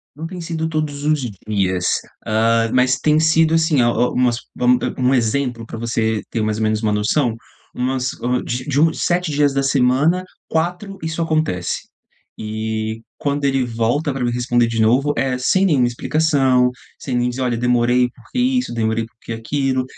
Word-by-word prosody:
Não 160 Hz, +2 st, -6 dB
tem 180 Hz, 0 st, -7 dB
sido 160 Hz, -1 st, -3 dB
todos 150 Hz, -2 st, -3 dB
os 150 Hz, -2 st, +1 dB, 0.2 s
dias, 95 Hz, -4 st, 0 dB, 0.4 s
ah, 115 Hz, +1 st, +2 dB
mas 130 Hz, +1 st, +3 dB
tem 155 Hz, 0 st, +3 dB
sido, 160 Hz, 0 st, +3 dB
assim, 160 Hz, -4 st, +3 dB
a 120 Hz, 0 st, +4 dB
o 125 Hz, +1 st, +1 dB
umas 125 Hz, -2 st, +2 dB, 0.2 s
vam 125 Hz, 0 st, +3 dB
a -, -, -4 dB
um 130 Hz, +1 st, +3 dB
exemplo 120 Hz, 0 st, 0 dB
pra 115 Hz, -, -7 dB
você 110 Hz, -2 st, -1 dB
ter 115 Hz, -, -1 dB
mais 110 Hz, 0 st, -1 dB
ou 110 Hz, -, 0 dB
menos 110 Hz, +1 st, 0 dB
uma 105 Hz, -1 st, +1 dB
noção, 110 Hz, +4 st, +1 dB, 0.4 s
umas, 130 Hz, +1 st, -1 dB
hã, 125 Hz, +1 st, 0 dB
de 125 Hz, +1 st, -3 dB
de 145 Hz, -1 st, 0 dB
uns 160 Hz, 0 st, +2 dB
7 175 Hz, -2 st, +1 dB
dias 145 Hz, -1 st, +2 dB
da 135 Hz, -, +1 dB
semana, 140 Hz, +6 st, +2 dB, 0.3 s
4 180 Hz, +4 st, -2 dB
isso 160 Hz, +1 st, -2 dB
acontece, 155 Hz, -, -1 dB, 0.5 s
eh 110 Hz, +1 st, -3 dB, 0.2 s
quando 145 Hz, 0 st, -1 dB
ele 135 Hz, -2 st, +2 dB
volta 120 Hz, +6 st, 0 dB
pra 135 Hz, -2 st, -3 dB
me 120 Hz, -, 0 dB
responder 120 Hz, -1 st, +1 dB
de 115 Hz, -1 st, -2 dB
novo 135 Hz, +6 st, +3 dB
é 130 Hz, -1 st, 0 dB
sem 190 Hz, +9 st, +2 dB
nenhuma 140 Hz, -9 st, +3 dB
explicação, 130 Hz, -1 st, +2 dB, 0.3 s
sem 125 Hz, -3 st, -3 dB
nem 120 Hz, 0 st, +1 dB
dizer: 130 Hz, +2 st, -4 dB
"Olha, 120 Hz, -2 st, 0 dB
demorei 125 Hz, +1 st, +2 dB
porque 125 Hz, -, -9 dB
isso, 255 Hz, -, +1 dB
demorei 110 Hz, 0 st, 0 dB
porque 115 Hz, 0 st, -10 dB
aquilo", 130 Hz, +3 st, -1 dB
125 Hz, 185 wpm, -19 LUFS, 115-150 Hz, 0.5 s, a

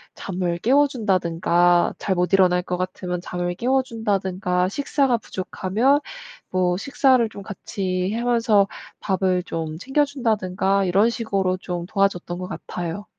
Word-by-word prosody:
잠을 180 Hz, -2 st, -3 dB
깨워 280 Hz, +8 st, +4 dB
준다든가 175 Hz, -6 st, +2 dB
잘 190 Hz, -, -1 dB
못 180 Hz, +2 st, 0 dB
일어날 180 Hz, -2 st, +4 dB
것 180 Hz, -, -3 dB
같으면 180 Hz, -1 st, -4 dB
잠을 175 Hz, 0 st, -3 dB
깨워 260 Hz, +6 st, +1 dB
준다든가 190 Hz, -6 st, -1 dB
식사가 270 Hz, +1 st, +1 dB
부족하면 215 Hz, +7 st, 0 dB, 0.5 s
뭐 180 Hz, -1 st, +1 dB
식사를 260 Hz, +1 st, +3 dB
좀 200 Hz, -2 st, -10 dB
같이 190 Hz, -2 st, -3 dB
하면서 230 Hz, -4 st, +2 dB, 0.3 s
밥을 185 Hz, -2 st, 0 dB
좀 160 Hz, -3 st, -4 dB
챙겨 270 Hz, +7 st, +1 dB
준다든가 200 Hz, -7 st, 0 dB
이런 195 Hz, +5 st, +3 dB
식으로 195 Hz, -5 st, -1 dB
좀 175 Hz, -2 st, -5 dB
도와줬던 195 Hz, -4 st, 0 dB
것 180 Hz, -, -5 dB
같아요. 175 Hz, +2 st, -5 dB
190 Hz, 295 characters per minute, -22 LUFS, 180-225 Hz, 0.5 s, 깨워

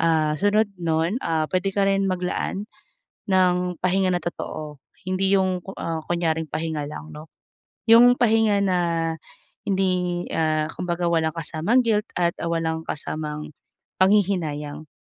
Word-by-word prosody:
Ah, 155 Hz, -2 st, +2 dB
sunod 205 Hz, +3 st, +3 dB
nun, 165 Hz, +3 st, 0 dB
ah, 160 Hz, -1 st, 0 dB
pwede 185 Hz, +1 st, 0 dB
ka 200 Hz, -, +2 dB
rin 195 Hz, 0 st, +2 dB
maglaan 185 Hz, +2 st, -2 dB, 0.6 s
ng 180 Hz, -1 st, +2 dB
pahinga 185 Hz, 0 st, +2 dB
na 175 Hz, -, +1 dB
totoo, 155 Hz, -3 st, -5 dB, 0.3 s
hindi 190 Hz, +1 st, +1 dB
'yung 185 Hz, -2 st, 0 dB
ku 195 Hz, -, -7 dB
ah, 165 Hz, -1 st, -3 dB
kunyaring 165 Hz, -2 st, 0 dB
pahinga 155 Hz, -2 st, -2 dB
lang 155 Hz, +1 st, -8 dB
'no. 155 Hz, +1 st, -11 dB, 0.6 s
'Yung 240 Hz, +2 st, +7 dB
pahinga 220 Hz, -3 st, +3 dB
na 185 Hz, -2 st, +2 dB, 0.9 s
hindi, 180 Hz, -2 st, 0 dB
ah, 155 Hz, -1 st, +1 dB
kumbaga 175 Hz, -1 st, -2 dB
walang 160 Hz, -1 st, +1 dB
kasamang 165 Hz, +10 st, +1 dB
guilt 210 Hz, 0 st, +1 dB
at 170 Hz, -1 st, +2 dB
ah, 170 Hz, -, -1 dB
walang 160 Hz, -1 st, -1 dB
kasamang 150 Hz, 0 st, -5 dB, 0.5 s
panghihinayang. 170 Hz, -7 st, +1 dB
175 Hz, 135 wpm, -23 LUFS, 160-195 Hz, 0.9 s, Yung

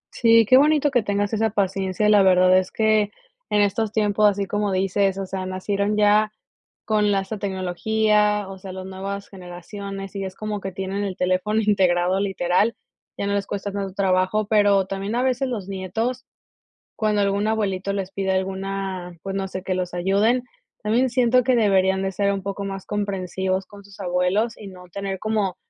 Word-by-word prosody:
Sí, 230 Hz, -1 st, +5 dB
qué 255 Hz, +5 st, +6 dB
bonito 295 Hz, 0 st, +4 dB
que 245 Hz, -3 st, +3 dB
tengas 205 Hz, 0 st, -1 dB
esa 220 Hz, 0 st, +1 dB
paciencia. 195 Hz, 0 st, 0 dB
La 210 Hz, -1 st, +6 dB
verdad 185 Hz, -1 st, +5 dB
es 185 Hz, 0 st, +1 dB
que 215 Hz, -2 st, +2 dB, 0.4 s
en 210 Hz, -, +3 dB
estos 205 Hz, +2 st, +1 dB
tiempos, 210 Hz, -1 st, +3 dB
así 200 Hz, 0 st, -2 dB
como 205 Hz, +1 st, -1 dB
dices, 195 Hz, +1 st, +1 dB
o 195 Hz, -, -3 dB
sea, 190 Hz, 0 st, -4 dB
nacieron 200 Hz, +2 st, -1 dB
ya 210 Hz, +1 st, +4 dB, 0.5 s
con 210 Hz, -1 st, +2 dB
la 195 Hz, -1 st, +2 dB
esta 200 Hz, +2 st, -6 dB
tecnología, 210 Hz, +2 st, +1 dB
o 190 Hz, 0 st, -9 dB
sea 185 Hz, 0 st, -8 dB
las 185 Hz, 0 st, -7 dB
nuevas 195 Hz, +1 st, -6 dB
generaciones, 195 Hz, +2 st, -8 dB
y 195 Hz, -, -3 dB
es 190 Hz, 0 st, -7 dB
como 215 Hz, -1 st, -4 dB
que 195 Hz, -, -5 dB
tienen 195 Hz, +2 st, -3 dB
el 195 Hz, -2 st, -4 dB
teléfono 185 Hz, +4 st, +1 dB
integrado 185 Hz, -3 st, +2 dB
literal, 195 Hz, +2 st, +1 dB, 0.4 s
ya -, -, -2 dB
no 200 Hz, -, 0 dB
les 200 Hz, -1 st, -1 dB
cuesta 200 Hz, 0 st, -4 dB
tanto 195 Hz, -1 st, -4 dB
trabajo, 190 Hz, +2 st, +1 dB
pero 205 Hz, -2 st, +4 dB
también 195 Hz, +3 st, -4 dB
a 245 Hz, -, +1 dB
veces 260 Hz, +1 st, 0 dB
los 210 Hz, -7 st, -4 dB
nietos 220 Hz, +7 st, -3 dB, 0.7 s
cuando 210 Hz, -2 st, +1 dB
algún 200 Hz, +1 st, +1 dB
abuelito 200 Hz, -3 st, -1 dB
les 195 Hz, -1 st, -4 dB
pide 195 Hz, -1 st, -1 dB
alguna 190 Hz, -1 st, -3 dB
pues 195 Hz, 0 st, -4 dB
no 195 Hz, 0 st, -2 dB
sé 185 Hz, 0 st, -6 dB
que 190 Hz, -, -3 dB
los 180 Hz, -1 st, -3 dB
ayuden, 200 Hz, +7 st, +2 dB, 0.4 s
También 235 Hz, +5 st, +2 dB
siento 250 Hz, 0 st, +3 dB
que 255 Hz, 0 st, +3 dB
deberían 190 Hz, -3 st, +3 dB
de 195 Hz, 0 st, -2 dB
ser 200 Hz, +1 st, +1 dB
un 195 Hz, -, -4 dB
poco 200 Hz, +1 st, -4 dB
más 195 Hz, -1 st, -6 dB
comprensivos 190 Hz, -2 st, -2 dB
con 205 Hz, -1 st, -14 dB
sus 200 Hz, -1 st, -16 dB
abuelos, 185 Hz, +5 st, 0 dB
y 210 Hz, -, -10 dB
no 180 Hz, -1 st, -12 dB
tener 195 Hz, -1 st, -4 dB
como 215 Hz, -4 st, -1 dB
200 Hz, 185 wpm, -23 LUFS, 190-210 Hz, 0.7 s, qué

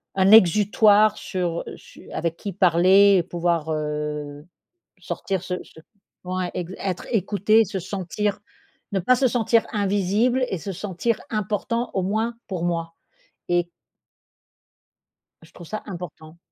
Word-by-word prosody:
un 190 Hz, +1 st, +4 dB
exutoire 210 Hz, +1 st, +5 dB
sur 175 Hz, -3 st, -3 dB
su -, -, -16 dB
avec 165 Hz, 0 st, -2 dB
qui 200 Hz, -3 st, -6 dB
parler 190 Hz, +2 st, +5 dB
et 175 Hz, -, +2 dB
pouvoir, 170 Hz, -2 st, -1 dB
heu, 150 Hz, -1 st, -4 dB, 0.5 s
sortir 190 Hz, -2 st, -4 dB
ce 180 Hz, 0 st, -3 dB
ce 160 Hz, -, -17 dB, 0.5 s
ouais, 185 Hz, -1 st, -2 dB
ex 180 Hz, +1 st, -5 dB
être 185 Hz, -2 st, -4 dB
écouté, 215 Hz, +1 st, +3 dB
se 190 Hz, 0 st, -4 dB
sentir 200 Hz, +2 st, -3 dB, 0.5 s
ne 195 Hz, -, +1 dB
pas 250 Hz, +8 st, +3 dB
se 260 Hz, +1 st, +2 dB
sentir 230 Hz, -1 st, +2 dB
invisible 205 Hz, +5 st, +1 dB
et 190 Hz, -, -2 dB
se 195 Hz, +5 st, -6 dB
sentir 205 Hz, +4 st, -2 dB
important, 215 Hz, +3 st, -2 dB
au 190 Hz, -, 0 dB
moins 220 Hz, +5 st, -1 dB
pour 180 Hz, -3 st, -4 dB
moi 165 Hz, -1 st, -2 dB, 0.5 s
et 175 Hz, 0 st, +1 dB, 1.7 s
je 165 Hz, -, -18 dB
trouve 175 Hz, -3 st, -12 dB
ça 215 Hz, -, -5 dB
important. 170 Hz, -3 st, -9 dB
190 Hz, 135 wpm, -23 LUFS, 170-210 Hz, 1.7 s, exutoire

